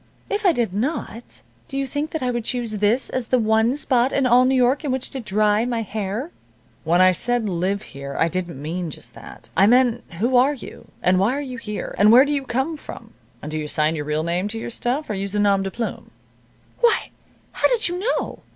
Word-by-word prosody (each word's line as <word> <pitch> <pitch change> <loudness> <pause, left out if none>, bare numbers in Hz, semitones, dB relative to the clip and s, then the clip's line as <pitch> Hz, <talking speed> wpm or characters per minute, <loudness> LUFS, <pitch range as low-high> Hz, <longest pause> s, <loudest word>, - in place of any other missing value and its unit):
"If 410 0 +1
I - - +6
did 235 - -1
not, 240 0 -4 0.2
do 275 - -5
you 275 - 0
think 290 +4 -3
that 320 -5 -4
I 250 - 0
would 240 -1 -2
choose 240 -1 -2
this 210 +5 +2
as 255 -3 -2
the 255 - +3
one 220 +3 +2
spot 255 -3 +2
in 275 - +1
all 250 +1 +5
New 265 +1 +2
York 255 +4 +2
in 290 - -2
which 260 -1 -2
to 270 - -4
dry 210 0 +1
my 235 -2 -1
hair?" 215 - -4 0.5
"When 170 +3 +3
I 185 0 +7
said, 240 +5 0
'Live 190 +2 -1
here,' 140 0 -8
I 165 - +3
didn't 175 -4 -4
mean 165 +4 -4
just - - -9
that. - - -12
I 195 - +5
meant 245 0 +3
who 235 +9 +1
are 270 +4 +4
you, 260 - -11 0.2
and 185 0 +3
why 215 +7 +2
are - - -2
you 255 -4 -6
here, 210 -4 -5
and 210 +2 +6
where 255 +4 +8
do 295 - -1
you 280 -2 -2
come 265 +6 -1
from, - - -11 0.3
and 150 - -6
do 155 - -2
you 150 - -4
sign 155 +2 +1
your 150 -2 -4
real 150 +1 -1
name 175 +4 0
to 225 +2 -5
your 225 - -6
stuff, 255 +6 -2
or - - -3
use 200 0 -3
a - - +1
nom 200 -1 +3
de 195 - -2
plume?" 230 +4 -5 0.7
"Why 475 -2 +2 0.4
how - - +2
did - - +1
you 355 +1 -3
know?" 455 +6 -2
230 Hz, 235 wpm, -22 LUFS, 195-260 Hz, 0.7 s, where